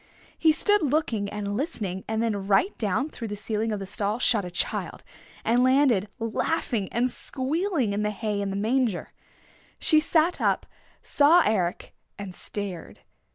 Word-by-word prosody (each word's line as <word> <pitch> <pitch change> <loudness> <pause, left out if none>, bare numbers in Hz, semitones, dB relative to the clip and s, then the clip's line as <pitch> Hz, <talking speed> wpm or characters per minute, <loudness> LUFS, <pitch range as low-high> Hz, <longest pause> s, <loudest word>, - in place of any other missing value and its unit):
He 320 - +4
stood 415 +6 +3
looking 260 -9 0
and 205 0 -4
listening, 210 - -3
and 220 +1 -1
then 205 -4 -2
right 210 - +3
down 225 +7 0
through 230 -6 -7
the 205 - -4
ceiling 215 +2 -2
of 210 - -1
the 195 - -5
stall 205 +2 -2
shot 230 -4 +2
a 180 - -5
child, 175 - -3 0.4
and 240 +2 +3
landed 255 -6 +3
laughing 230 -2 -1
and 240 +2 +2
squealing 275 - -1
in 205 - -1
the 210 - 0
hay 210 -1 -2
in 200 - -2
the 195 - -3
manger. 225 0 0 0.6
She 310 - +4
sat 320 +2 +2
up, - - +1 0.4
saw 320 +4 +5
Eric 185 -5 -1 0.2
and 200 -2 -7
stared. 190 -3 -6
220 Hz, 160 wpm, -26 LUFS, 200-275 Hz, 0.6 s, saw